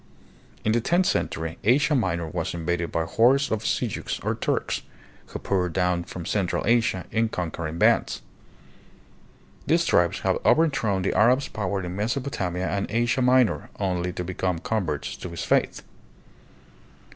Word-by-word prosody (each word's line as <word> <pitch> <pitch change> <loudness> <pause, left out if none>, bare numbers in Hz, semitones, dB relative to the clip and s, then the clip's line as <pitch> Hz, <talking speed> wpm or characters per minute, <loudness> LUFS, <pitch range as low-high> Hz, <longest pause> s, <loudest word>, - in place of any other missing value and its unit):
In 110 - +3
the 115 +1 +2
tenth 175 +9 +2
century 80 - -2
Asia 135 +7 +3
Minor 90 - 0
was 85 +1 -3
invaded 85 0 -2
by 80 - 0
hordes 125 +11 +3
of 110 -1 -1
Sel 110 +3 0
juks, 110 - -4
or - - +1
Turks, - - -1 0.5
who - - -6
poured 90 -3 -1
down 90 -1 0
from 85 -2 -7
central 95 -2 -1
Asia 115 -5 +2
hi 115 +1 +2
conquering 85 -5 -4
bands. - - +2 1.4
These - - +3
tribes - - +2
had - - +1
overthrown 135 - +2
the 95 - 0
Arab's 125 +7 +3
power 100 -2 -2
in 90 0 -5
Mesopotamia 105 -5 -2
and 100 0 -2
Asia 120 +4 +1
Minor 125 -2 +3
only 90 -2 -1
to 90 - -4
become 90 0 -2
converts 85 -6 -2
to 90 - -7
his 85 - -5
faith. - - +1
95 Hz, 150 wpm, -25 LUFS, 90-120 Hz, 1.4 s, In